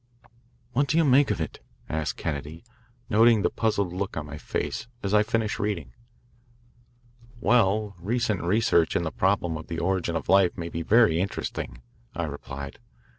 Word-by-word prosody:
"What 140 +3 +2
do 150 +5 +1
you 165 - +5
make 140 +1 +5
of 105 - -1
it?" 80 - -4 0.3
asked 80 -1 -2
Kennedy, 75 +1 -5 0.4
noting 115 -1 +5
the - - +2
puzzled 100 -5 0
look 95 -1 -3
on 75 - -3
my 75 0 -8
face 115 +8 -3 0.2
as 100 0 -1
I 105 - +6
finished 110 0 -1
reading. 105 0 -2 1.5
"Well, 105 -3 +2
recent 110 +1 0
research 90 -3 +2
in - - +1
the 80 - -2
problem 90 -4 +1
of 80 - -9
the 85 - -4
origin 85 -1 0
of 85 - -3
life 95 -2 +4
may 85 -1 -4
be 85 - -4
very 100 -3 +4
interesting," 90 -9 -4 0.3
I - - -2
replied. 70 +1 -7
95 Hz, 165 wpm, -26 LUFS, 85-110 Hz, 1.5 s, I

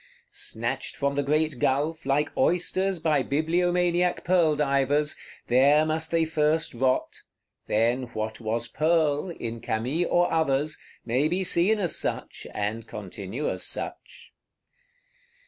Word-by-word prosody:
Snatched - - -4
from 140 0 0
the 145 - 0
great 150 -1 0
gulf, 145 +4 0
like 145 +2 +1
oysters 185 +2 +1
by 155 -3 +1
bibliomaniac 175 +4 +1
pearl 170 -4 +3
divers, 145 +1 +1 0.3
there 140 +5 +4
must 160 0 -1
they 165 -1 +2
first 155 +1 +1
rot, 130 +2 0 0.5
then 120 +4 +1
what 110 0 -3
was 115 +1 -2
pearl, 155 +3 +1
in 115 -8 -5
Camille 125 +11 -1
or 175 -1 +2
others, 150 -1 +1 0.3
may 125 +6 +1
be 180 +4 0
seen 185 +4 +2
as 180 -5 0
such, - - -3
and 105 +2 -3
continue 100 +6 -5
as - - -3
such. - - -7
150 Hz, 130 wpm, -26 LUFS, 130-165 Hz, 0.5 s, there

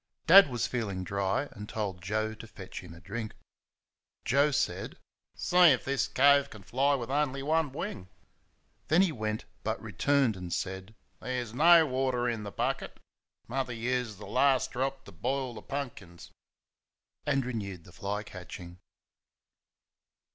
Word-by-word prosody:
Dad 190 -1 +9
was 120 -3 -1
feeling 100 -7 -3
dry, 100 +4 0
and 105 0 -9
told 100 -5 -3
Joe 110 +4 -1
to 110 +1 -11
fetch 95 -4 -9
him 90 -3 -11
a - - -13
drink. 110 +5 -6 0.9
Joe 140 +3 +4
said: 115 -10 -1 0.4
"See 180 - -1
first 175 -5 +9
if 125 - -3
this 135 0 0
cove 140 +1 +5
can 110 -7 -12
fly 140 +7 +2
with 125 -1 -4
only 140 -1 0
one 155 0 +1
wing." 130 - -5 0.8
Then 170 +5 +5
he 185 - +1
went, 110 -5 -3 0.2
but - - -2
returned 140 -6 +1
and 90 -2 -7
said: 95 +4 -4 0.2
"There's 125 -3 -4
no 165 +4 +7
water 130 -2 0
in 115 -2 -1
the 100 -1 -6
bucket - - -2 0.5
Mother 130 0 -2
used 120 -2 -2
the 105 - -9
last 135 0 +2
drop 135 +2 -2
to - - -11
boil 130 +8 -2
th' - - -26
punkins," 110 -11 -6 1.0
and 135 -3 +1
renewed 100 -8 -5
the 90 - -15
fly 100 +4 -4
catching. 90 -3 -10
120 Hz, 155 wpm, -30 LUFS, 100-140 Hz, 1.0 s, Dad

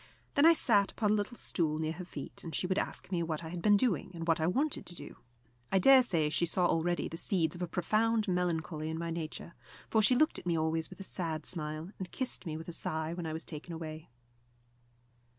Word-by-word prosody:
Then 285 +3 +6
I 335 - +9
sat 210 -10 +3
upon 210 -3 +1
a - - +5
little 215 +3 -1
stool 155 -3 0
near 155 0 -1
her 170 +3 -6
feet, 150 -5 -8
and 165 - -5
she - - 0
would 190 +1 +1
ask - - -4
me 175 -2 +1
what 165 -1 -2
I 160 - -6
had 175 0 -5
been 205 +1 +5
doing, 200 - +1
and 165 0 -5
what 165 0 +3
I 160 - +2
wanted 275 - +1
to 175 - -5
do. 145 - -9 0.5
I 195 - +4
dare 265 +7 +8
say 170 -11 +1
she 170 - +1
saw 180 +2 +1
already 175 +1 +1
the 165 - -7
seeds 165 -3 +1
of 175 - -9
a 180 - -1
profound 215 +6 +1
melancholy 165 -3 -1
in 160 - -3
my 170 0 -3
nature, 165 +1 -5 0.4
for 220 - +4
she 250 +4 +5
looked 310 +5 +3
at - - -10
me 170 -1 +2
always 160 0 0
with - - -11
a - - -5
sad 160 -5 -3
smile, 155 +1 -4
and 185 -2 -6
kissed 255 -7 -2
me 155 -1 -3
with 160 - -9
a - - -4
sigh 160 0 -2
when 170 -1 -4
I 155 - -3
was 160 - -3
taken 160 +2 -7
away. 155 -1 -7
170 Hz, 240 wpm, -32 LUFS, 160-195 Hz, 0.5 s, I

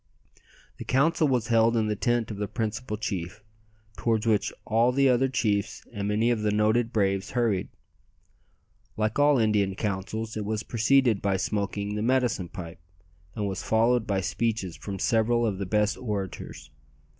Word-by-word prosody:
The - - -6
council 155 +4 +2
was 125 -4 0
held 115 0 +4
in 110 - +2
the 105 0 -1
tent 120 +1 0
of 105 - -6
the 105 0 -2
principal 110 0 -3
chief, 105 -2 -4 0.5
towards 115 -2 0
which 110 -3 +2
all 115 +3 +3
the 135 +1 +3
other 130 +1 +3
chiefs 105 -6 -1
and 100 -2 -3
many 110 +3 +2
of 115 -3 0
the 105 - +1
noted 110 +3 +2
braves 100 -3 0
hurried. 110 -6 +1 1.3
Like 110 +4 0
all 145 -1 +5
Indian 105 -4 +2
councils, 110 +3 -3
it 110 - -3
was 110 +1 -2
preceded 120 -1 +2
by 100 -1 +1
smoking 100 +1 -2
the 105 - -2
"medicine 120 -7 +1
pipe," 85 -1 -8 0.6
and 105 -1 -2
was 95 -1 -3
followed 115 +1 +2
by 100 -2 0
speeches 100 -2 -2
from 95 +7 -6
several 120 +3 +2
of 100 -4 -2
the 100 - -3
best 105 +2 +1
orators. 100 -7 -5
110 Hz, 165 wpm, -27 LUFS, 100-120 Hz, 1.3 s, all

